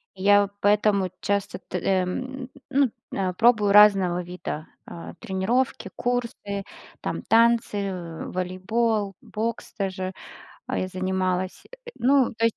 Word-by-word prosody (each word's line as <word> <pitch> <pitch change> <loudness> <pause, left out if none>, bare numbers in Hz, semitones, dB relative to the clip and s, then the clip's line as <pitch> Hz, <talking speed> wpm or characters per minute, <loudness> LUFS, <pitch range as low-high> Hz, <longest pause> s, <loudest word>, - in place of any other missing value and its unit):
Я 200 +1 +4
поэтому 205 -2 +3
часто 200 -1 -1
т 180 - -5
э, 185 +1 +1
ну, 265 +4 -2 0.2
э, 185 -2 -1
пробую 220 0 +4
разного 195 -4 +6
вида, 175 -3 -6 0.2
а, 170 - -9
тренировки, 215 +7 -1
курсы, 235 -5 -2 0.4
там, - - -3
танцы, 230 -1 +3
э, 180 -5 -4
волейбол, 195 +3 -1
бокс 225 +1 -4
даже, 190 -1 -3 0.5
а, - - -2
я 185 - -1
занималась, 185 0 -2 0.3
ну 265 0 +3
то 225 - -1
есть. 230 - +2
200 Hz, 120 wpm, -25 LUFS, 185-230 Hz, 0.5 s, разного